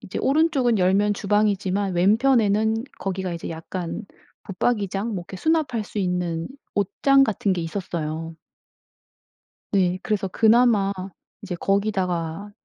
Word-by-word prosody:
이제 205 -5 -6
오른쪽은 275 -6 +2
열면 195 +3 +3
주방이지만 200 -2 0
왼편에는 220 +2 +3
거기가 190 -1 -3
이제 165 - -6
약간 170 +5 -5 0.4
붙박이장 200 0 -1
뭐 175 -3 -4
그렇게 190 - -7
수납할 280 - 0
수 210 - -7
있는 180 -3 -1 0.3
옷장 270 +8 +3
같은 205 -4 0
게 180 - -1
있었어요. 165 -2 -4 1.4
네. 185 -2 +2
그래서 205 -3 -1
그나마 220 -1 +4 0.5
이제 195 -3 -5
거기다가 190 -2 -1
200 Hz, 285 characters per minute, -23 LUFS, 180-220 Hz, 1.4 s, 그나마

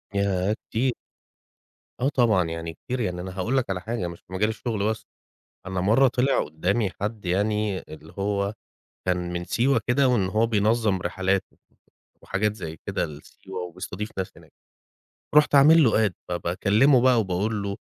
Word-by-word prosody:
ياه، 100 +1 +1
كتير، 125 +2 +1 1.1
آه 135 - +3
طبعًا 115 -9 +3
يعني 80 0 -5
كتير، 130 +5 -5
يعني 90 -5 -2
أنا 95 +1 -7
هاقول 120 +8 0
لك 125 - 0
على 90 -2 -2
حاجة، 110 -4 -3
مش 85 0 -8
في 95 - -15
مجال 105 +4 +1
الشغل 110 -2 -2
بس، 110 - -3 0.6
أنا 95 -1 -2
مرّه 115 +8 +4
طلع 125 +3 +1
قدّامي 95 +7 -1
حد 105 0 -3
يعني 105 +2 0
اللي 80 +1 -11
هو 100 +1 -1 0.5
كان 90 -1 -1
من 85 0 -3
سيوة 120 +4 +2
كده، 130 +2 +3
وإن 120 -6 +2
هو 110 +4 +2
بينظّم 110 -2 +2
رحلات 95 +2 0 0.8
وحاجات 105 +2 -1
زي 80 -5 -7
كده - - -1
لسيوة 90 +5 -9
وبيستضيف 90 +4 -6
ناس 95 - -3
هناك، - - -17 0.8
رُحت 150 -1 +5
عامل 155 +3 +7
له 110 -2 +4
Add، - - -13 0.2
فباكلمه 100 +10 +3
بقى 125 -2 +4
وباقول 100 +2 -1
له: 100 0 -3
100 Hz, 160 wpm, -25 LUFS, 90-115 Hz, 1.1 s, عامل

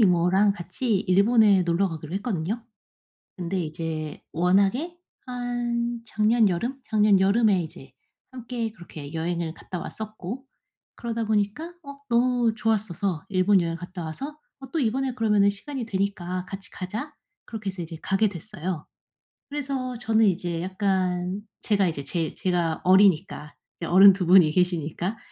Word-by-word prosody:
이모랑 190 +1 +4
같이 195 +5 -2
일본에 200 +1 +4
놀러 175 +3 +1
가기로 160 +1 -7
했거든요. 200 +1 -2 0.7
근데 185 0 -2
이제 155 -1 -4
워낙에 200 - +2 0.3
한 240 -1 -2
작년 220 0 +3
여름? 235 +10 -2
작년 210 -3 +4
여름에 200 -1 +3
이제 135 -4 -11 0.4
함께 240 -2 -4
그렇게 160 -7 -10
여행을 165 0 -2
갔다 180 - -7
왔었고 220 +6 -7 0.5
그러다 230 -1 -3
보니까 215 +11 -1
어 280 -1 -10
너무 240 -1 +3
좋았어서 200 -6 -1
일본 190 0 +4
여행을 165 -1 -2
갔다 175 +1 -7
와서 275 - -6 0.2
"어, 270 -1 -11
또 330 - 0
이번에 260 +1 0
그러면은 210 -4 +3
시간이 245 +5 -5
되니까 190 -3 -2
같이 195 0 -9
가자." 220 +11 -5 0.3
그렇게 220 -4 -5
해서 185 -1 -7
이제 165 -1 -6
가게 205 +2 +2
됐어요. 175 -3 -5 0.6
그래서 270 -3 -3
저는 225 -1 +3
이제 175 -3 0
약간 185 0 -1 0.2
제가 200 -3 +2
이제 155 -4 -3
제 165 +3 -2
제가 175 -3 0
어리니까 185 -5 +3 0.2
이제 170 - -4
어른 195 +2 +8
2 185 -1 -2
분이 175 -3 +7
계시니까 180 +3 0
195 Hz, 315 characters per minute, -25 LUFS, 175-230 Hz, 0.7 s, 어른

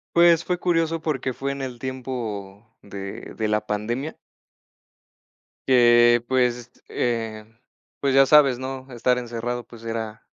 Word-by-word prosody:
Pues 170 -1 +5
fue 180 -1 -2
curioso 165 -2 +1
porque 135 -5 -2
fue 140 +2 -3
en 140 - -7
el 125 -3 -6
tiempo 115 -6 -5 0.2
de 100 -1 -8
de 110 -1 -1
la 105 0 0
pandemia. 120 +9 -3 1.5
Que, 120 -2 +6
pues, 125 -2 0 0.2
eh, 115 -3 -2 0.5
pues, 140 -1 +1
ya 135 0 +6
sabes, 140 -4 +5
¿no?, 130 0 -6
estar 125 +1 +1
encerrado, 120 0 -4
pues, 115 -1 -14
era 115 -1 -5
120 Hz, 135 wpm, -23 LUFS, 115-135 Hz, 1.5 s, Que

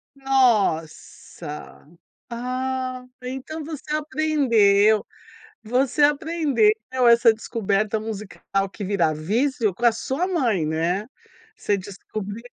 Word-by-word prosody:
Nossa! 205 - -1 0.4
Ah, 255 +1 -3 0.2
então 265 +5 -6
você 300 0 -5
aprendeu 235 -10 +3 0.6
você 250 +5 0
aprendeu 290 -6 +3 0.4
essa 235 -1 +6
descoberta 215 -1 -1
musical 205 -2 -4
que 200 +1 -7
vira 175 -5 +1
vício 220 - 0
com 235 +7 -3
a 235 - +7
sua 265 +9 -2
mãe, 245 - 0
né. 165 +6 -1 0.5
Você 205 - 0
descobriu. 200 +2 -7
230 Hz, 95 wpm, -23 LUFS, 200-265 Hz, 0.6 s, a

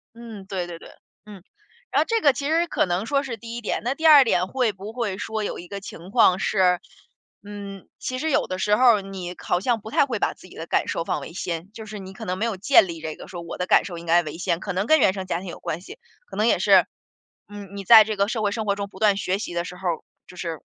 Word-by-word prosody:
嗯， 225 -4 -10
对 185 -3 -4
对 170 -1 -7
对。 - - -13 0.4
嗯， 210 -1 -11 0.6
然 - - +3
后 - - +1
这 455 -1 +1
个 285 -3 +5
其 280 +2 -4
实 335 +2 +2
可 - - +1
能 180 +4 -1
说 280 +2 +1
是 240 -4 -5
第 230 +1 -8
一 240 - -5
点， 215 - -2
那 255 +3 -1
第 320 - -5
二 290 -3 +9
点 185 -6 +1
会 245 -4 0
不 195 +3 -8
会 225 -6 -3
说 220 0 -3
有 - - -3
一 175 - -10
个 200 +1 -6
情 185 -2 -10
况 200 -5 +4
是， 185 -4 +2 0.6
嗯， 200 -2 -9
其 255 - -4
实 315 - -1
有 - - +1
的 185 0 -4
时 210 +1 +3
候 245 -2 +6
儿 - - -4
你 185 -2 -7
好 175 - 0
像 235 0 +1
不 220 - -10
太 - - +4
会 235 -6 -3
把 - - 0
自 - - -16
己 - - -15
的 165 - -6
感 - - 0
受 165 - -2
放 - - -2
为 - - -8
先， 175 +1 -5
就 220 0 -9
是 210 -1 -8
你 190 0 -9
可 - - -9
能 185 +1 -2
没 220 - -1
有 215 -5 -2
建 205 -1 +5
立 165 -1 -6
这 160 -1 -5
个 - - -11
说 175 -2 -7
我 170 - -7
的 180 - -2
感 - - +4
受 175 -3 -6
应 170 - -9
该 170 +1 +4
为 155 +1 -7
先， 175 -2 -1
可 200 -1 -4
能 190 +3 -1
跟 315 -1 +5
原 190 - +4
生 190 -2 -5
家 175 -2 -2
庭 190 - -9
有 170 - -8
关 160 - -4
系。 305 - -12 0.3
可 - - -11
能 - - +1
也 - - +3
是， - - +5 0.6
嗯， 205 -2 -10
你 195 - -5
在 220 0 +10
这 215 0 -3
个 200 +1 +2
社 225 -1 -2
会 205 -1 +1
生 220 +1 -3
活 200 -1 +1
中 200 0 -4
不 190 - -14
断 210 -2 +4
学 195 -1 -1
习 175 - -5
的 170 0 -1
时 180 0 -9
候 185 - -5
儿， 165 - -2 0.3
就 180 - -14
是 165 -3 -5
200 Hz, 315 characters per minute, -24 LUFS, 180-225 Hz, 0.6 s, 在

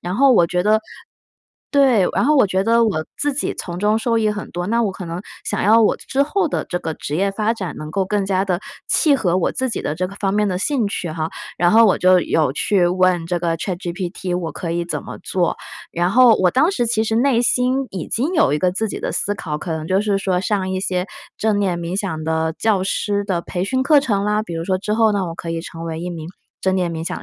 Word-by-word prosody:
然 180 +2 -4
后 275 +1 +5
我 175 -8 +5
觉 180 +1 0
得 215 +2 +3 0.9
对， 260 -9 +4
然 - - +2
后 300 +3 +4
我 260 - +5
觉 190 0 0
得 230 +1 +4
我 190 -8 -1
自 290 -1 0
己 285 - -1
从 175 -1 -6
中 210 +3 +2
受 230 0 0
益 215 -1 +2
很 210 -1 -6
多。 175 +1 -4
那 235 +2 +2
我 210 - 0
可 190 - -8
能 170 +1 -5 0.2
想 - - -2
要 225 +3 +5
我 215 - +3
之 275 - -1
后 335 +4 0
的 - - -2
这 175 - -3
个 160 -2 -4
职 150 - -4
业 195 +3 +1
发 210 +3 0
展 190 -8 -5
能 155 0 -7
够 195 +3 0
更 205 0 0
加 190 0 0
地 180 -3 0 0.3
契 305 -4 +3
合 180 -9 +1
我 185 - 0
自 260 - -2
己 230 - -3
的 150 - -2
这 185 +3 -1
个 195 - -10
方 195 -2 0
面 210 0 +1
的 185 - -1
兴 250 +2 0
趣 180 -4 -4
哈， 155 0 -3 0.3
然 175 0 +4
后 225 +3 +6
我 200 - +3
就 185 0 +5
有 155 -5 +1
去 185 +2 +2
问 180 -1 +2
这 175 0 -1
个 165 -1 -1
ChatGPT 180 0 -3
我 165 -4 -4
可 165 +2 -5
以 170 +1 -1
怎 175 - -3
么 - - -9
做？ 180 -2 0 0.4
然 175 +1 0
后 245 +1 +6
我 185 -1 +3
当 290 - +3
时 245 -11 -1
其 225 -1 +1
实 220 - -1
内 240 -1 +3
心 255 +2 +1
已 185 -4 -5
经 275 +10 -1
有 310 - +3
一 - - 0
个 180 +3 +2
自 220 +4 -2
己 - - -5
的 - - -3
思 205 - -1
考， 160 -8 -4
可 170 - -6
能 160 -1 -4
就 190 +3 +2
是 205 -1 0
说 190 -2 0
上 190 -1 -1
一 185 0 -2
些 185 -2 -1 0.3
正 215 -2 +1
念 190 -4 0
冥 170 +2 -3
想 160 -6 -3
的 160 0 -1
教 205 -4 +1
师 205 +1 -1
的 185 -4 -1
培 180 +1 -3
训 260 +6 0
课 285 +2 +5
程 205 -7 0
啦。 210 +1 +1
比 175 -6 -7
如 165 0 -3
说 185 +1 0
之 210 +2 -2
后 220 -1 +3
呢 195 -2 -1
我 165 - -5
可 165 - -6
以 165 0 -2
成 165 0 -8
为 165 -1 -4
1 175 - -4
名 165 -2 -7 0.3
正 190 0 +2
念 180 -2 0
冥 165 0 -5
想 - - -4
190 Hz, 295 characters per minute, -20 LUFS, 175-220 Hz, 0.9 s, 后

